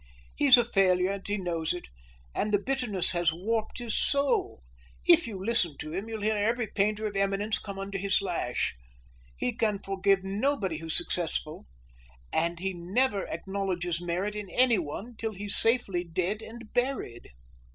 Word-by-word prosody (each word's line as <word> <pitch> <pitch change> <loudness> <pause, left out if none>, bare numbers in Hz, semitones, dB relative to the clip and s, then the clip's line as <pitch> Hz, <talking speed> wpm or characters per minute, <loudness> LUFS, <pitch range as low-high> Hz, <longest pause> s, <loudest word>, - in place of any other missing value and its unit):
He's 280 -3 +8
a 240 - +3
failure, 185 -4 +3
and 200 -1 -5
he 205 0 0
knows 170 -3 -1
it, 175 - -7 0.5
and 210 - -1
the 205 - +5
bitterness 235 -4 -1
has 175 -2 +2
warped 215 +6 -2
his 235 -3 -3
soul. 330 +8 +1 0.4
If 340 -5 +6
you 210 -4 -5
listen 185 -10 +1
to 155 - -6
him, 195 +5 -3
you'll 220 -2 -4
hear 215 +1 +2
every 225 +3 +1
painter 210 +1 0
of 205 -1 -3
eminence 195 +2 +1
come 200 -2 -7
under 195 0 -4
his 195 +1 +2
lash. 175 - -1 0.6
He 125 - -1
can 215 -3 +1
forgive 195 0 +1
nobody 200 - 0
who's 165 -1 -2
successful, 160 - -2 0.7
and 170 0 +1
he 190 +1 -2
never 195 +5 0
acknowledges 180 -1 -2
merit 180 +4 -2
in 210 -2 -5
anyone 225 - +1
till 220 0 -3
he's 205 +1 -3
safely 225 -7 +2
dead 180 +5 -2
and 230 0 -10
buried." 245 - -1
200 Hz, 160 wpm, -29 LUFS, 180-225 Hz, 0.7 s, He's